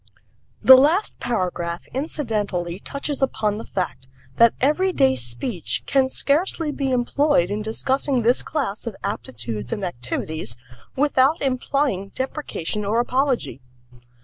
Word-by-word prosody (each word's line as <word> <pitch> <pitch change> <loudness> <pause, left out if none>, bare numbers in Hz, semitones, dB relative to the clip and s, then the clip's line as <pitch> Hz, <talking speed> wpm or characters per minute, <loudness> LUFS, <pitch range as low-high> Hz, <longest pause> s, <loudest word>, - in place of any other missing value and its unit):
The 260 - +11
last 310 +10 +3
paragraph 175 -6 -2
incidentally 210 - -2
touches 280 +5 -4
upon 215 -5 0
the - - -7
fact 135 -9 -4 0.3
that 230 -1 +6
everyday 295 - +3
speech 120 - -2
can 265 -1 +2
scarcely 305 +3 0
be 275 -2 -2
employed 250 - +2
in 210 +1 -2
discussing 260 +3 0
this 240 +3 +3
class 250 -8 -3
of 220 - -4
aptitudes 115 - -4
and 205 -4 -2
activities 130 -3 -3 0.4
without 280 +2 +3
implying 260 -6 0
deprecation 260 - -3
or 210 +3 +1
apology. 250 - 0
235 Hz, 120 wpm, -22 LUFS, 180-275 Hz, 0.4 s, The